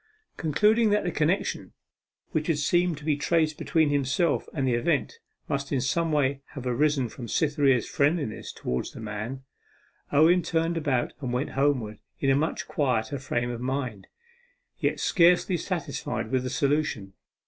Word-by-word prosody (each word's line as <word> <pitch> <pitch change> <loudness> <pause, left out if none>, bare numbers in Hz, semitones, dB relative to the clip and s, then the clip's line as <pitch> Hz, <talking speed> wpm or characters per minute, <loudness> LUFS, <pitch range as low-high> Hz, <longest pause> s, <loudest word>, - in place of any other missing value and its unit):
Concluding 210 +8 +3
that 210 0 +2
the 180 - -1
connection 165 +5 -1 0.6
which 155 -3 -1
had 165 -3 +1
seemed 175 +3 +1
to 150 - -11
be 155 -2 +2
traced 155 +1 +1
between 160 -3 +2
himself 145 +3 +1
and 135 -4 -1
the 125 - +2
event 160 - 0 0.3
must 140 -3 -2
in 135 - +1
some 165 +6 0
way 140 -2 +1
have 135 -3 -6
arisen 135 +1 +1
from 120 +1 -8
Cytherea's 145 -6 +2
friendliness 145 -5 0
towards 60 - -4
the - - -9
man, 110 +5 -5 0.7
Owen 160 +5 +5
turned 165 0 0
about 140 -7 0
and 130 -3 -3
went 125 +4 -1
homewards 130 -7 0 0.2
in 135 - +2
a - - +4
much 155 +3 -1
quieter 130 -2 0
frame 120 -2 -2
of 120 0 -5
mind 125 -6 -3 0.7
yet - - 0
scarcely 180 0 +4
satisfied 165 - -3
with 130 -1 +2
the 125 - -3
solution. 140 -8 0
145 Hz, 160 wpm, -27 LUFS, 125-160 Hz, 0.7 s, Owen